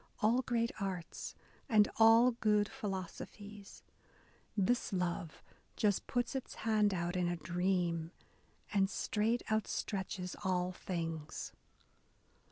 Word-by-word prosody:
All 230 +4 +4
great 235 -2 0
arts, 190 -4 -4 0.3
and 215 -3 +6
all 225 +2 +7
good 210 -3 +2
philosophies, 205 -2 -7 0.7
This 210 +5 +2
love 175 -3 -2 0.3
just 205 -3 +1
puts 245 +1 0
its 265 -2 -4
hand 215 -2 +4
out 175 -1 -1
in 180 -1 +1
a 175 - 0
dream 175 -1 0 0.6
And 195 -1 +3
straight 220 +4 0
outstretches 195 -3 -2
all 180 -1 +1
things. 165 -4 -4
195 Hz, 105 wpm, -35 LUFS, 180-220 Hz, 0.7 s, all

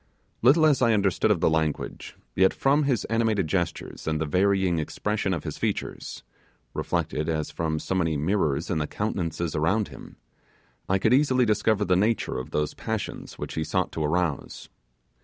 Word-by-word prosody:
Little 145 +7 +6
as 150 -4 +3
I 115 -2 +4
understood 100 0 +2
of 100 -6 +2
the - - +4
language, 80 -1 -2 0.2
yet 95 0 +4
from 145 +2 +2
his 130 -4 +1
animated 110 -4 +1
gestures 85 0 -3
and 80 -1 0
the 80 - 0
varying 95 +1 +2
expression 105 +5 -2
of 85 -5 -2
his - - -6
features - - -3 0.5
reflected 75 +2 -2
as 80 -2 -2
from 80 -1 -2
so 85 - -3
many 80 -5 +1
mirrors 75 -2 0
in 80 - 0
the 75 - -1
countenances 85 -6 -2
around 95 +8 +1
him, - - -12 0.7
I 95 - +3
could 110 +5 +2
easily 130 -2 +4
discover 105 -1 +2
the 90 - +3
nature 105 - +1
of 65 +3 -7
those 75 -1 -1
passions - - -5
which - - -5
he 80 - -1
sought 95 +2 -1
to 80 - -3
arouse. 80 -1 -2
95 Hz, 175 wpm, -26 LUFS, 80-110 Hz, 0.7 s, Little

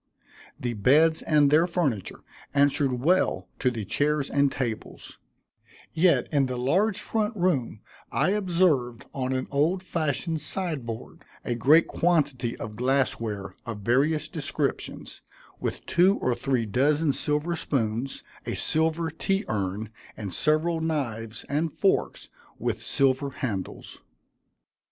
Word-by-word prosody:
The 120 -1 -2
beds 150 +9 +4
and 150 -2 +3
their 160 +3 +5
furniture 145 - -1 0.3
answered 140 -1 +3
well 180 +7 +2
to 130 - +2
the 115 -4 -4
chairs 145 +7 0
and 140 -1 +3
tables; 120 -5 -5 0.7
yet 170 +2 +3
in 140 -3 +2
the 125 -1 -3
large 185 - +1
front 215 0 -1
room 145 - 0 0.3
I 185 - +2
observed 170 - +1
on 130 -1 -2
an 130 0 -1
old 160 +7 +1
fashioned 160 -1 -1
side 155 -4 -2
board, 115 -1 -7 0.2
a - - 0
great 140 +8 +5
quantity 145 -8 0
of 110 -2 -7
glass 130 +3 +1
ware, 105 -4 -5
of 110 -3 -5
various 145 +8 +2
descriptions, 150 -3 -3 0.4
with - - -4
two 185 +4 +4
or 125 - 0
three 125 -1 0
dozen 145 +8 +2
silver 150 +5 0
spoons, 125 -4 -2 0.2
a - - -2
silver 160 +1 +1
tea 195 +5 -1
urn, 105 +1 -2 0.3
and 100 -4 -5
several 160 +2 +1
knives 115 -9 -3
and 150 +3 -1
forks 195 - 0 0.3
with - - -3
silver 135 +1 +2
handles. 110 -9 -5
140 Hz, 130 wpm, -26 LUFS, 120-160 Hz, 0.7 s, their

